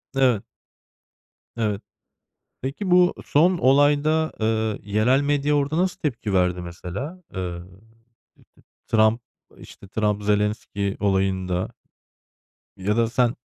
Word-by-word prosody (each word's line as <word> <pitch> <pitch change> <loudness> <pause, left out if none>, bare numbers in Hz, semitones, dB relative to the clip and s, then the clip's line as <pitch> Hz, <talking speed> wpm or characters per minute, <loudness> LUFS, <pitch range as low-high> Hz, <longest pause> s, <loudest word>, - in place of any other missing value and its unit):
Evet. 125 -6 +3 1.1
Evet. 105 -3 -1 0.8
Peki, 145 +9 -3
bu 180 0 +5
son 175 +5 +3
olayda, 145 +4 +3
ııı, 110 -1 0
yerel 110 +6 +2
medya 145 0 +1
orada 145 +2 0
nasıl 180 +1 0
tepki 120 -8 -2
verdi, 90 -1 +2
mesela? 90 - -7
Iıı, 90 -1 -5 0.9
T - - -25 0.3
Trump, 110 +1 +3 0.4
işte, 100 - -14
Trump, 105 0 -1
Zelenski 105 -1 -1
olayında 95 -2 0 1.1
ya 100 +3 -1
da 115 -1 +2
sen 120 0 +2
110 Hz, 105 wpm, -23 LUFS, 100-145 Hz, 1.1 s, bu